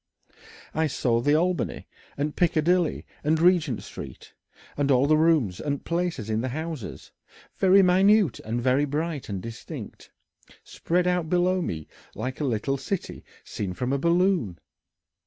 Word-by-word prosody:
I 160 +1 +1
saw 120 -4 0
the 145 +4 +3
Albany 175 +3 -1 0.3
and 150 +1 -2
Piccadilly 175 0 +1 0.2
and 155 +2 +2
Regent 165 - +3
Street - - -10 0.4
and 145 -1 0
all 130 0 +4
the 155 +2 +4
rooms 155 - +2
and 145 -2 -3
places 170 - -2
in 110 0 0
the 130 - -2
houses, 155 -4 -6 0.5
very 195 +1 +5
minute 190 +1 +4
and 115 +2 -3
very 130 +4 +2
bright 150 -1 -3
and 95 -2 -4
distinct, 115 -1 -9 0.5
spread 180 +1 -1
out 180 -3 0
below 180 +1 +2
me 80 - -4 0.3
like 130 0 -4
a 150 - -1
little 130 +2 -1
city 175 +7 -5 0.2
seen 95 -3 -5
from 125 +7 -2
a 140 - 0
balloon. 170 - +1
150 Hz, 145 wpm, -26 LUFS, 125-175 Hz, 0.5 s, very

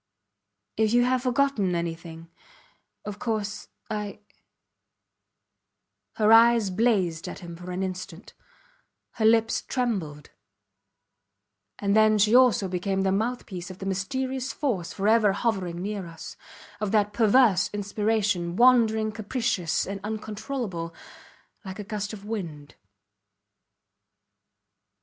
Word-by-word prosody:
If 220 0 +2
you 245 0 +5
have 255 0 +1
forgotten 250 -7 +1
anything... 165 -1 -5 0.7
of 210 0 -6
course... 215 -2 -3 0.2
I... 210 -2 -4 2.0
Her 215 0 +4
eyes 230 -3 +6
blazed 185 -6 +1
at - - -7
him 170 -1 -8
for 175 +2 -10
an 180 +1 -2
instant; 185 0 -7 0.8
her 220 - -2
lips 225 0 +3
trembled 190 - -3 1.5
and 200 0 0
then 215 0 +5
she 210 +2 +3
also 245 -6 +5
became 190 +1 -1
the 190 - +2
mouth 230 +5 -1
piece 180 -3 -7
of 185 - -9
the 190 - -7
mysterious 260 +7 -2
force 200 - -2
forever 210 0 +3
hovering 190 -5 -2
near 200 -3 -4
us; 165 -1 -10 0.4
of 210 -2 -2
that 210 -1 +2
perverse 225 -2 +4
inspiration, 205 -3 -1
wandering 225 -2 +4
capricious 215 -5 -1
and 195 +1 -5
uncontrollable, 210 -4 -5 0.7
like 190 -2 -7
a 210 - -5
gust 210 0 -4
of 205 -2 -9
wind. 165 -10 -6
210 Hz, 115 wpm, -26 LUFS, 185-225 Hz, 2.0 s, eyes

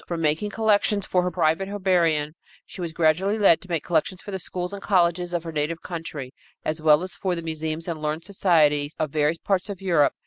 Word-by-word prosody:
From 170 -1 -3
making 160 +6 0
collections 210 -2 +2
for 180 - +1
her 180 - 0
private 165 +1 +1
herbarium, 170 -7 +1 0.3
she 185 - -10
was 170 -2 -3
gradually 170 +6 +2
led 195 -6 +5
to 185 - -15
make 165 -3 -1
collections 175 +2 0
for 205 - -9
the 190 - -3
schools 180 +2 -5
and 200 - -6
colleges 175 -3 +2
of 175 -2 -2
her 165 - -6
native 155 +2 -2
country, 155 -6 -6 0.3
as 155 +1 -2
well 155 +1 +5
as 185 - -5
for 185 -2 -2
the 170 - -5
museums 160 0 -4
and 165 -3 -4
learned 155 +2 -2
societies 155 -7 +2
of 155 -3 -2
various 150 +2 +1
parts 195 +3 -1
of 200 -3 -5
Europe. 170 -7 +2
170 Hz, 215 wpm, -24 LUFS, 155-185 Hz, 0.3 s, led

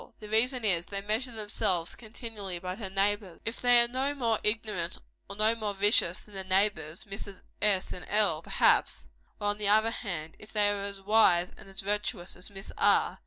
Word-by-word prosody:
The 210 - -10
reason 240 +2 +1
is, 175 -4 +2
they 200 -1 -4
measure 220 +5 -1
themselves, 210 -5 -1
continually, 215 -4 -7
by 180 +1 -5
their 195 -1 -6
neighbors. 195 -1 0
If 225 - -4
they 245 -1 +6
are - - 0
no 265 +4 -2
more 230 -5 +1
ignorant 210 -5 -1 0.3
or 200 - -3
no 215 +2 +4
more 215 -3 -3
vicious 195 -3 +4
than 210 - -15
their 190 -1 -4
neighbors 185 -4 0
Misses 200 -1 -8 0.2
S. 200 -3 +2
and 180 - -9
L., 205 -7 +2
perhaps - - +2 0.3
or 205 - -4
on 205 0 -2
the 210 - -1
other 220 +2 +4
hand, 170 -9 -5
if 210 - -13
they 205 -1 +3
are 200 -1 -3
as 200 -1 -5
wise 190 -4 +4
and - - -14
as 195 0 -6
virtuous 205 -2 -3
as 180 - -7
Miss 195 -1 -10
R. - - +3
205 Hz, 200 wpm, -29 LUFS, 190-220 Hz, 0.3 s, they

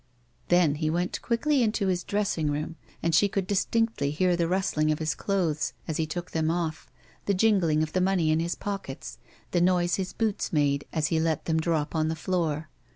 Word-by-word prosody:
Then 175 -4 +4
he 155 - +1
went 175 +3 -1
quickly 265 +4 +1
into 215 -3 +1
his 180 -2 0
dressing 200 -7 0
room, 150 +3 -3 0.3
and 165 - +1
she 200 +6 +5
could 195 -1 -1
distinctly 210 -4 0
hear 180 +4 +2
the 170 -1 +1
rustling 165 -4 +1
of 155 - 0
his 155 -1 -1
clothes 175 -7 -1
as 160 - -2
he 160 - 0
took 175 +3 -5
them 160 -1 0
off, 165 -2 -2 0.4
the 200 - +2
jingling 185 -7 +3
of 155 - -5
the 185 - +2
money 180 -4 +2
in 155 - +2
his 170 +1 -1
pockets, 195 -10 -6 0.3
the 175 - +2
noise 175 -1 +2
his 190 -1 -3
boots 220 -3 -1
made 145 -2 +1
as 155 -2 0
he 160 - +1
let 160 -2 0
them 160 -1 +1
drop 160 -2 0
on 155 -1 +1
the 160 - -1
floor. 160 -3 -1
170 Hz, 205 wpm, -27 LUFS, 155-190 Hz, 0.4 s, she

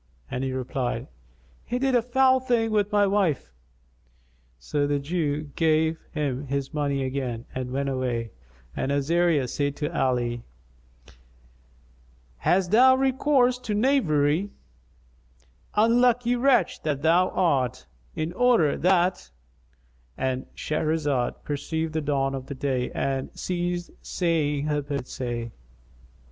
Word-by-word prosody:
and 125 - -2
he 135 - -1
replied, 130 -1 -3 0.6
"He 245 - -3
did 265 +1 +1
a 245 - +4
foul 260 +2 +3
thing 240 -3 0
with 210 -1 +1
my 205 -1 +4
wife." 190 - 0 1.1
So 145 - -1
the 145 0 +1
Jew 150 -1 -2
gave 160 0 +2
him 145 -3 -2
his 140 +2 -3
money 140 -2 -1
again 130 -3 -3
and 130 0 -3
he - - -8
went 140 +1 -1
away; 125 -4 -2 0.4
and 135 - -1
Azariah 150 0 +2
said 140 +3 -2
to 150 - -4
Ali, 120 -2 0 2.0
"Hast 180 - +1
thou 260 +4 +7
recourse 265 -1 +2
to 225 -4 -3
knavery, 190 - +2 1.3
unlucky 240 +2 +3
wretch 245 -6 +2
that 145 -2 -2
thou 175 +3 +4
art, 140 -9 0 0.3
in 160 +2 -3
order 235 -9 +3
that"——And 65 - -3
Shahrazad 150 -4 -1
perceived 160 +2 -3
the 160 - 0
dawn 135 -2 0
of 135 -1 -6
day 130 -2 -1
and 135 -1 -2
ceased 175 -1 -2
saying 150 -5 0
her 150 -1 0
permitted 140 -3 -4
say. 120 -2 -4
150 Hz, 120 wpm, -25 LUFS, 130-195 Hz, 2.0 s, thou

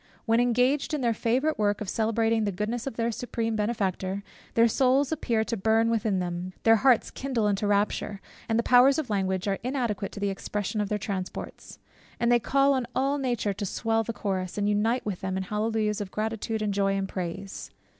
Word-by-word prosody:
When 230 0 +3
engaged 250 +5 +2
in 295 - -3
their 235 -2 +2
favourite 255 +7 0
work 205 -1 +1
of 210 - -5
celebrating 225 +2 +1
the 205 - 0
goodness 220 +6 -3
of 270 - -4
their 230 0 0
Supreme 225 -1 -2
Benefactor, 200 -3 -1 0.3
their 230 0 +6
souls 265 +4 +2
appear 235 -8 0
to 230 - -2
burn 225 +2 +2
within 215 -3 +1
them, 180 0 -3
their 225 0 +6
hearts 255 0 +3
kindle 255 -5 -1
into 205 0 0
rapture; 205 0 0 0.3
the 225 +1 +2
powers 255 +4 +6
of 285 -8 -3
language 190 -1 0
are 195 -1 0
inadequate 240 -6 -2
to - - -7
the 200 -1 0
expression 205 +2 -3
of 205 - -2
their 210 - 0
transports; 195 -3 -6 0.4
and 235 0 +2
they 240 - +5
call 275 +5 +3
on 255 -3 -1
all 275 +2 +1
nature 240 -6 -1
to 205 - -6
swell 225 +3 0
the 230 - -3
chorus, 190 -4 -3
and 205 - 0
to - - +2
unite 225 +4 +1
with 200 -4 -3
them 190 0 -2
in 190 - -2
hallelujahs 210 +1 -1
of 200 - -5
gratitude, 220 +1 -2
and 205 -1 0
joy, 195 0 +1
and 195 0 -1
praise. 190 +1 -5
220 Hz, 205 wpm, -27 LUFS, 200-240 Hz, 0.4 s, their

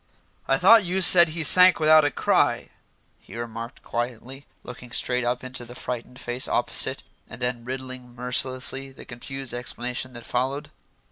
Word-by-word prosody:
"I - - +2
thought 230 -2 +6
you 185 +1 -2
said 175 -1 +7
he 160 +1 -4
sank 180 +6 +7
without 155 0 +5
a 145 - +2
cry," - - 0 0.5
he - - -14
remarked 115 0 -8
quietly, 125 +3 -6 0.2
looking 125 0 -11
straight 125 +1 -1
up 120 +1 -2
into 130 -1 -7
the 120 +1 -13
frightened 125 +1 -7
face 120 +1 -3
opposite, - - 0 0.3
and 115 - -10
then 125 -1 -3
riddling 130 -1 -8
mercilessly 130 +2 -1
the 130 - -14
confused 135 +2 -8
explanation 125 +1 -5
that 120 0 -9
followed. 130 +4 -3
125 Hz, 155 wpm, -23 LUFS, 120-135 Hz, 0.5 s, said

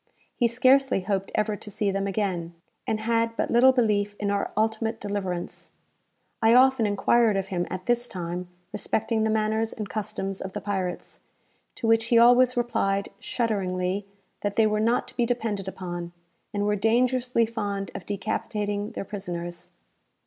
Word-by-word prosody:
He 240 - +3
scarcely 255 -1 +3
hoped 195 +1 -2
ever 215 0 +1
to 210 - -9
see 205 0 0
them 195 0 -1
again, 185 -4 -2 0.3
and 220 -1 -1
had 230 0 +1
but - - -1
little 245 +3 +7
belief 210 -5 +1
in 205 -1 0
our 200 0 -1
ultimate 220 +1 0
deliverance. 190 -4 -4 0.7
I 225 +1 +5
often 255 -3 +5
enquired 210 +1 +3
of 195 0 -2
him, 175 -2 -1
at 185 0 -5
this 240 0 +1
time, 180 -2 -5 0.3
respecting 220 +2 0
the 220 - +1
manners 220 +1 0
and 210 -2 -5
customs 195 -2 -4
of 190 0 -6
the - - -3
pirates; 190 -3 -4 0.6
to - - -5
which 225 0 +4
he 235 0 +3
always 245 +2 +6
replied, 200 -5 0
shudderingly, 195 -4 -1 0.3
that 205 0 -2
they 225 - +4
were 215 0 +1
not 230 +3 +1
to - - -16
be 240 - +1
depended 220 -5 -2
upon, 175 -2 -5 0.4
and 205 0 -1
were 210 0 +2
dangerously 240 +2 +2
fond 205 -3 -3
of - - -8
decapitating 205 0 -2
their - - -5
prisoners. 175 -3 -6
210 Hz, 165 wpm, -26 LUFS, 195-230 Hz, 0.7 s, little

